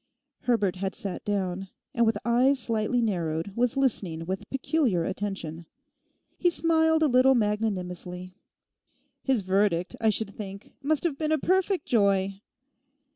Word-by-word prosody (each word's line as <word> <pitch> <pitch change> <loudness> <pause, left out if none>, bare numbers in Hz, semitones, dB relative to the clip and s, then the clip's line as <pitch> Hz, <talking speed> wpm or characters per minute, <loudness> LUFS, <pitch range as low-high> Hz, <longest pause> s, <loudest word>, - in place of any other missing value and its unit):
Herbert 210 -7 +1
had 190 +1 -3
sat 195 -3 -5
down, 195 -2 -2 0.3
and 235 -1 +3
with 220 -2 +2
eyes 250 +4 +4
slightly 230 0 0
narrowed 170 -2 -2
was 245 +2 +1
listening 190 -11 0
with 190 +2 -4
peculiar 265 - +1
attention. 175 -4 -4 0.7
He 355 - +4
smiled 320 -1 +3
a - - +5
little 260 0 +5
magnanimously. 185 -5 -2 0.9
'His 260 -7 +1
verdict, 190 -2 +1
I 220 - +4
should 210 -1 -1
think, 200 -1 -8
must 290 +1 0
have 315 -5 -1
been 310 -1 0
a 315 - +4
perfect 375 +2 +1
joy. 195 -3 +2
210 Hz, 135 wpm, -27 LUFS, 190-265 Hz, 0.9 s, a